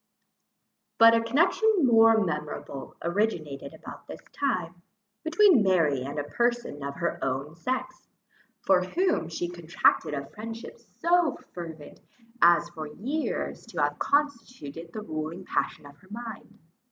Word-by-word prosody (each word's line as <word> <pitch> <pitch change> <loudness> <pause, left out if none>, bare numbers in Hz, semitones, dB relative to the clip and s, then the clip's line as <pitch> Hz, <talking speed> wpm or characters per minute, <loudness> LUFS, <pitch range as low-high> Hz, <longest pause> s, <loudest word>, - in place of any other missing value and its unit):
But 230 0 +8
a 230 - +4
connection 350 - +3
more 225 -2 +6
memorable 150 -3 -5
originated 170 -6 -2
about - - -11
this - - -8
time, 180 -11 -2 0.4
between 330 - +5
Mary 165 -9 +2
and 140 +3 -5
a 145 - -1
person 235 - -1
of 140 0 -4
her 170 -1 -2
own 135 +3 -2
sex, 255 +10 -4 0.6
for 190 -2 +4
whom 335 - 0
she 170 +1 -3
contracted 170 -3 +1
a 140 0 -4
friendship 225 +7 -8
so 335 +5 +1 0.2
fervent, 165 -4 -8 0.4
as 170 0 +6
for 155 -2 -7
years 255 - -3
to - - -6
have - - -1
constituted 230 - -2
the 215 - -6
ruling 160 +1 -5
passion - - -2
of 145 0 -13
her 185 - -21
mind. 225 0 -8
185 Hz, 135 wpm, -27 LUFS, 155-240 Hz, 0.6 s, But